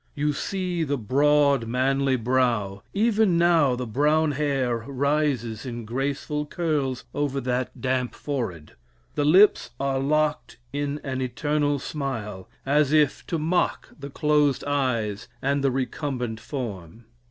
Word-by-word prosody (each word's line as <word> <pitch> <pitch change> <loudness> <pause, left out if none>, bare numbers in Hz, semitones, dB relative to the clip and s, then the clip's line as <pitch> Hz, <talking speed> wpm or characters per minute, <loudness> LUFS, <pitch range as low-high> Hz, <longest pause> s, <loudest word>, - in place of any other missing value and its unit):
You 150 +1 0
see 180 +1 -2
the 145 -2 -1
broad 140 +1 +3
manly 135 +2 +1
brow 115 -5 0
even 215 -3 +2
now 165 -6 +4
the 125 0 -4
brown 150 +6 +2
hair 135 -4 0
rises 135 -3 -1
in 120 -3 -6
graceful 140 +5 -2
curls 145 -7 -1
over 145 -1 -1
that 125 -2 -2
damp 130 -1 -1
forehead. 110 - -4 0.4
The 145 - 0
lips 185 - +5
are 135 -1 0
locked 150 +2 0 0.2
in 145 +1 -2
an 130 -2 -3
eternal 145 +3 0
smile, 115 -9 -5 0.2
as 145 +1 +3
if 150 -2 +2
to 170 - -1
mock 165 +3 0
the 140 0 -7
closed 150 -1 +2
eyes 120 -8 -1
and 140 +1 0
the 135 - +4
recumbent 125 -3 -3
form. 110 - -6
140 Hz, 130 wpm, -25 LUFS, 125-150 Hz, 0.4 s, lips